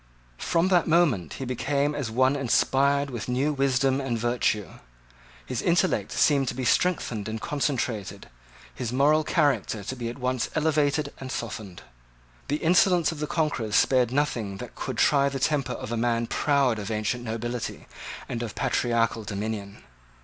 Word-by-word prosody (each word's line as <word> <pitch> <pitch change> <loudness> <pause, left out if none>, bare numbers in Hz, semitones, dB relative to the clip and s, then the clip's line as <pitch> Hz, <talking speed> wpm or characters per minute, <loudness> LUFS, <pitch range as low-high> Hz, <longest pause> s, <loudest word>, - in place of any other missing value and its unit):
From 170 +2 +1
that 180 -3 +3
moment 155 - +2
he 135 - -5
became 140 +3 0
as 140 -6 -3
one 130 +4 +2
inspired 140 +1 +2
with 120 0 -5
new 135 +5 +1
wisdom 135 0 +1
and 125 -4 -2
virtue. 115 -3 0 0.8
His - - -3
intellect - - +1
seemed 140 -3 +3
to - - -2
be 130 0 -3
strengthened 120 - +1
and 110 0 -4
concentrated, 130 - -2 0.5
his 120 -3 -4
moral 145 +4 +3
character 145 - +1
to 130 - -5
be 120 -2 -4
at 120 - -7
once 130 -1 -1
elevated 150 -2 +1
and 130 -1 -6
softened. 105 -7 -6 0.6
The 145 - 0
insolence 175 0 +4
of 160 - -8
the 150 - -2
conquerors 140 -11 -1
spared 125 -3 +3
nothing 120 -8 -1
that - - -8
could - - -5
try 140 -1 +4
the 140 - -4
temper 135 -2 0
of - - -6
a 120 - -1
man 115 0 +1
proud 135 -3 +1
of 100 - -5
ancient 110 +3 -2
nobility 120 +1 -4 0.4
and 120 - -4
of 115 -3 -5
patriarchal 115 -2 0
dominion. 100 -1 -5
130 Hz, 160 wpm, -26 LUFS, 115-145 Hz, 0.8 s, insolence